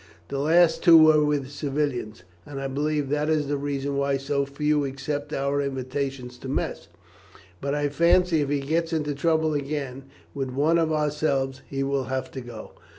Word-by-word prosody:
The 140 - -3
last 165 +3 +4
two 170 -3 +9
were 155 -1 +6
with 145 -2 -1
civilians, 140 - -3 0.2
and 140 -2 -7
I 135 - -3
believe 145 +1 -1
that 150 +1 0
is 155 -2 +2
the 145 - 0
reason 140 0 -2
why 140 0 +1
so 140 +1 -1
few 150 +1 0
accept 140 +2 -4
our 140 +1 0
invitations 135 -2 -4
to 130 - -7
mess; 135 - -3 0.7
but 140 +1 -1
I 145 0 0
fancy 170 +2 +3
if 140 - -1
he 145 -1 0
gets 165 +4 -1
into 150 -2 -1
trouble 160 +1 +1
again 140 -2 -4 0.3
with 135 -2 -3
one 150 +6 +2
of 160 -1 +1
ourselves 145 -3 0
he 135 0 -2
will 135 -1 -1
have 130 0 -3
to 130 - -6
go." 120 -3 -9
145 Hz, 180 wpm, -25 LUFS, 135-150 Hz, 0.7 s, two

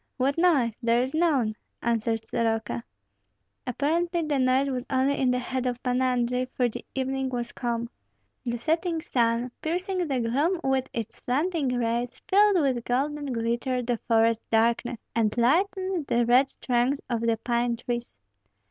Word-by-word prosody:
"What 270 +2 +1
noise? 310 -10 +3
There 235 0 +3
is 260 - -4
none," 290 -10 +2 0.3
answered 225 -1 0
Soroka. 225 - -1 0.8
Apparently 335 +7 0
the 295 -3 0
noise 260 +2 +3
was 255 -2 -2
only 270 +1 +2
in 260 - +2
the 250 - +2
head 255 +1 -2
of 245 0 -3
Pan 250 0 +1
Andrei, 250 0 +1
for 250 - +2
the 230 - -6
evening 265 0 -1
was 240 -1 -3
calm. 235 -1 -2 0.6
The 240 0 -2
setting 325 +5 -1
sun, 235 0 +1
piercing 360 +2 -1
the 270 -3 0
gloom 285 +10 +1
with 265 -1 0
its 230 -2 -5
slanting 300 +3 0
rays, 235 +1 -1
filled 410 -1 +5
with 260 -6 +1
golden 285 +3 -1
glitter 235 +2 -1
the 240 0 0
forest 230 0 +3
darkness, 235 +2 +2 0.2
and 225 -1 +1
lighted 370 +5 +1
the 235 0 +2
red 255 +3 +4
trunks 250 +3 +1
of 235 -2 -1
the 230 -1 +1
pine 235 +1 0
trees. 240 - -5
250 Hz, 155 wpm, -26 LUFS, 235-285 Hz, 0.8 s, filled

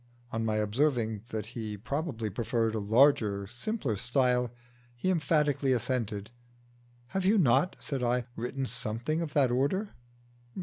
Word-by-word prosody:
On 115 0 -1
my 110 -1 0
observing 110 0 0
that 110 -3 -4
he 110 -3 -4
probably 120 - -3
preferred 115 +1 0
a 110 - -1
larger, 105 -2 +3
simpler 125 - -2
style, 125 +1 +2 0.5
he 185 +10 0
emphatically 150 -4 +2
assented. 115 -4 -2 0.8
"Have 190 +5 -1
you 200 +4 +4
not," 140 - +3
said 135 -4 -3
I, 125 0 +1
"written 130 +3 -3
something 120 +7 -2
of 160 -4 -4
that 135 -4 +4
order?" 145 - +1
125 Hz, 135 wpm, -30 LUFS, 110-145 Hz, 0.8 s, you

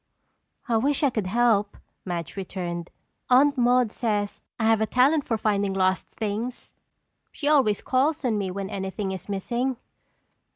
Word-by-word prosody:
"I 230 -2 +2
wish 280 +6 +1
I 280 - +4
could 215 -5 -2
help," 210 -1 +2 0.3
Madge 175 -3 -4
returned. 175 -3 -5 0.4
"Aunt 280 +3 +5
Maude 245 -2 +3
says 210 -4 -2 0.2
I 220 - +1
have 225 -1 +4
a 220 - +1
talent 275 +6 +3
for 225 - 0
finding 200 -2 0
lost 185 0 +1
things. 225 +3 -5 0.6
She 290 - -4
always 265 -9 +3
calls 285 +3 +1
on 235 -3 +1
me 200 -2 -1
when 195 +2 -5
anything 190 0 -3
is 190 +1 -7
missing." 240 +6 -1
220 Hz, 155 wpm, -25 LUFS, 195-250 Hz, 0.6 s, Aunt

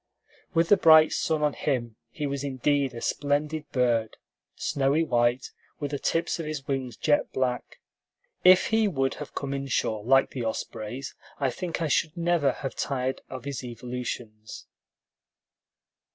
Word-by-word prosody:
With 165 0 +3
the 205 - +7
bright 160 -2 +7
sun 155 -2 0
on 150 -1 +2
him, 120 -6 -2
he 150 - -4
was 140 -1 -3
indeed 140 -1 0
a 115 - -6
splendid 150 +2 -1
bird, 120 -4 +1 0.4
snowy 140 +3 +1
white, 120 -2 +1 0.3
with 145 -1 -3
the 145 - -2
tips 165 +1 0
of 165 - -4
his 150 -3 -5
wings 130 -4 -3
jet 150 -2 +1
black. 125 -1 -2 0.6
If 185 0 +7
he 220 -1 +3
would 135 -8 0
have 150 - -8
come 140 -1 -3
inshore 130 -6 -1
like 135 +3 +4
the 125 - -4
ospreys, 115 +3 -4 0.3
I 135 -3 +1
think 170 +4 -4
I - - +1
should 155 +3 0
never 170 -4 +2
have 135 - -5
tired 130 -1 -2
of 130 0 -7
his 140 -2 -4
evolutions. 120 -2 -6
135 Hz, 150 wpm, -27 LUFS, 125-150 Hz, 0.6 s, the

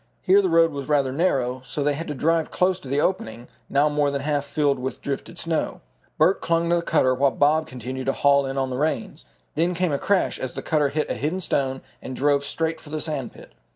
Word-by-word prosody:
Here 195 +1 +5
the 190 - 0
road 165 0 +4
was 140 -2 -6
rather 140 -3 +2
narrow, 130 -5 0
so 135 +3 -3
they 145 0 +2
had 165 +4 -5
to 150 - -4
drive 165 +3 +1
close 185 0 +1
to 140 - -11
the 140 +2 0
opening, 120 -9 -2 0.2
now 140 +2 +3
more 150 -1 +1
than 140 -1 -2
half 145 0 -1
filled 145 -2 +1
with 130 +1 -4
drifted 140 +5 -5
snow. 165 -2 -2 0.4
Bert - - +3
clung 170 0 +1
to 175 - +4
the - - 0
cutter 150 -6 +2
while 135 +2 +3
Bob 150 +4 +2
continued 130 +1 -6
to 135 - +2
haul 140 -1 +3
in 135 +1 -4
on 135 -1 -1
the 125 - -2
reins. 155 +1 -2 0.3
Then 170 +3 0
came 180 -1 0
a 140 - 0
crash, 200 -2 +1
as 130 - -5
the - - -5
cutter 150 -3 +1
hit 155 +2 -1
a - - +1
hidden 160 +6 -2
stone 135 -6 -1 0.2
and 130 - -6
drove 140 +1 +2
straight 160 +3 -2
for 150 - -13
the 155 +1 -3
sand 150 -6 -4
pit. - - -14
145 Hz, 240 wpm, -24 LUFS, 135-165 Hz, 0.4 s, Here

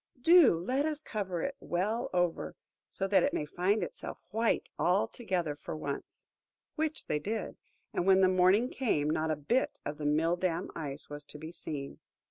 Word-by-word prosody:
Do 325 - +7
let 260 - 0
us 305 -2 -2
cover 190 -5 -3
it 275 - -2
well 205 +7 -1
over, 175 -2 0 0.3
so 195 - -2
that 195 -2 +4
it - - +1
may 150 - -1
find 185 +6 +1
itself - - -6
white 225 +2 +1
altogether 180 -3 0
for 150 - -6
once!" 145 -2 -6 0.5
Which 315 0 -2
they 150 - 0
did; 210 +6 -3 0.4
and 175 - -1
when 190 0 +6
the 190 - +6
morning 185 +5 +4
came, 155 - +1
not 160 +1 0
a 155 - +2
bit 190 - 0
of 145 +1 -4
the 150 - -1
mill 165 +4 +2
dam 175 -1 -1
Ice 145 -3 -5
was 145 0 -7
to 150 - -8
be 160 +2 -8
seen. 145 -5 -4
180 Hz, 180 wpm, -31 LUFS, 155-215 Hz, 0.5 s, Do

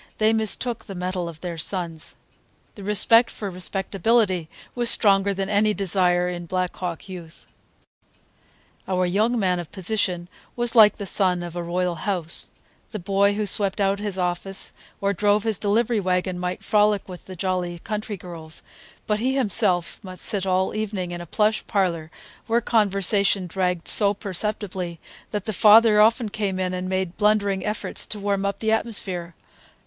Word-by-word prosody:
They 215 +1 +3
mistook 225 +2 0
the 195 - -8
mettle 180 -1 -3
of 160 -1 -12
their 170 -2 -5
sons. 165 -3 -4 0.6
The 200 - -11
respect 225 +4 +5
for 200 -3 -6
respectability 190 0 0 0.2
was 240 -1 +4
stronger 200 -3 +5
than 195 0 -3
any 210 +1 +2
desire 180 -2 +1
in 175 -1 -5
Black 185 0 -2
Hawk 180 +1 -5
youth. 175 -3 -10 1.4
Our 185 -1 0
young 215 +7 +1
man 185 -4 +1
of 175 - -8
position 185 -3 +1 0.3
was 240 -1 +2
like 215 -2 +7
the 205 - -6
son 185 -2 +1
of 175 -1 -8
a 175 - -3
royal 175 +1 -1 0.2
house; 170 -4 0 0.4
the 215 - -6
boy 200 +1 +1
who 210 0 -1
swept 200 0 0
out 200 0 +1
his 205 -2 -4
office 180 +2 -2 0.3
or 200 0 +1
drove 205 +2 +2
his 220 -4 -1
delivery 220 +2 +1
wagon 180 -1 -1
might 180 0 -4
frolic 210 -1 +2
with 180 -2 -10
the 185 - -9
jolly 180 -1 -2
country 210 +3 -5
girls, 165 -3 -7 0.4
but 210 0 0
he 260 +4 0
himself 200 -8 +1
must 185 -1 -8
sit 200 -4 0
all 185 0 +1
evening 205 -4 -3
in 175 0 -6
a 175 - -9
plush 215 +5 +1
parlor 175 -6 -1 0.4
where 230 +1 +2
conversation 200 -3 +2
dragged 180 -1 -2
so 205 -1 +5
perceptibly 190 -3 -3 0.3
that 205 -2 -4
the 220 - -2
father 215 +2 +6
often 225 +2 +3
came 200 -3 -3
in 185 -1 -1
and 185 0 -4
made 185 -2 -2
blundering 205 -2 +1
efforts 210 0 -4
to 210 - -6
warm 200 -1 -1
up 200 0 -3
the 220 +1 -1
atmosphere. 190 -7 -1
195 Hz, 165 wpm, -23 LUFS, 180-210 Hz, 1.4 s, like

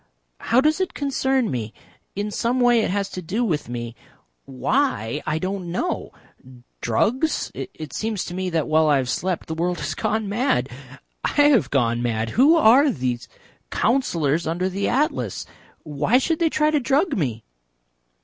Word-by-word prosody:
How 245 +3 +3
does 310 +5 +2
it 375 - -2
concern 265 - 0
me? 115 -4 -4 0.4
In 205 +1 -3
some 235 +5 0
way 245 -1 +4
it - - -1
has 200 +1 -1
to 185 - -6
do 205 +8 -1
with 155 - -2
me. 120 -1 -5 0.5
Why, 145 - -1
I 155 0 0
don't 185 0 -4
know. 175 - -2 0.7
Drugs? 245 - 0
It 155 -4 -8
seems 215 -3 -2
to - - -7
me 185 0 -2
that 165 -3 -1
while 155 0 +3
I 145 - +4
have 130 -2 -1
slept 185 -1 -2
the 160 - -5
world 175 +2 -1
has 145 +2 -3
gone 215 +3 -1
mad. 200 - 0 0.5
I - - -1
have 290 - +4
gone 120 -3 +1
mad.... 115 -2 -1
Who 285 +7 +5
are 280 -1 +6
those 125 - -3 0.4
Councillors 170 - +1
under 175 +3 -1
the 195 +2 -2
Atlas? 285 +5 -1 0.4
Why 150 - +1
should 315 +5 0
they 335 -1 +3
try 305 0 +2
to 300 - +2
drug 285 +5 +1
me?" 120 - -2
190 Hz, 170 wpm, -22 LUFS, -, 0.7 s, are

